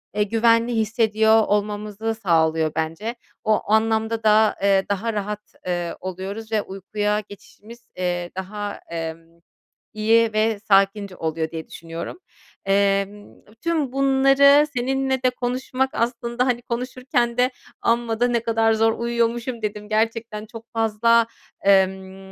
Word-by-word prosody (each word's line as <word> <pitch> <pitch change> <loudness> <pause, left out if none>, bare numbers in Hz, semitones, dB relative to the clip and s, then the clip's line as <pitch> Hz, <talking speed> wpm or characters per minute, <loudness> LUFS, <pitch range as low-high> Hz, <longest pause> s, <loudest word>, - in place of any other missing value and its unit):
eee, 210 - +3
güvenli 230 +2 +2
hissediyor 220 0 +3
olmamızı 210 +1 -1
sağlıyor 160 -6 +1
bence. 165 +9 -3 0.3
O 215 -1 +2
anlamda 220 0 +1
da, 215 0 +4
eee, 195 -1 +3
daha 210 +3 -1
rahat, 210 0 -5
eee, 175 -1 -2
oluyoruz 195 +4 -6
ve 215 -2 +2
uykuya 205 +2 -2
geçişimiz, 225 +3 -14
eee, 175 -1 -2
daha, 205 +2 -5
emm, 165 0 -6 0.5
iyi 225 +1 +3
ve 215 -1 +1
sakince 195 -1 +2
oluyor 160 -1 -3
diye 160 -1 -6
düşünüyorum. 165 - -7 0.5
Emm, 200 +1 0 0.3
tüm 320 -6 0
bunları 275 +2 +5
seninle 265 +1 0
de 255 - +5
konuşmak 255 +1 -2
aslında, 235 +1 -1
hani, 245 -2 0
konuşurken 250 0 -2
de 250 +1 +3 0.3
"Amma 230 -1 0
da 245 - +3
ne 240 -1 +1
kadar 225 -1 +2
zor 225 0 +3
uyuyormuşum." 235 0 -1
dedim. 210 0 -4
Gerçekten 220 0 -1
çok 225 +1 -11
fazla, 225 +1 +3 0.3
emm 190 0 +1
220 Hz, 125 wpm, -22 LUFS, 195-235 Hz, 0.5 s, bunları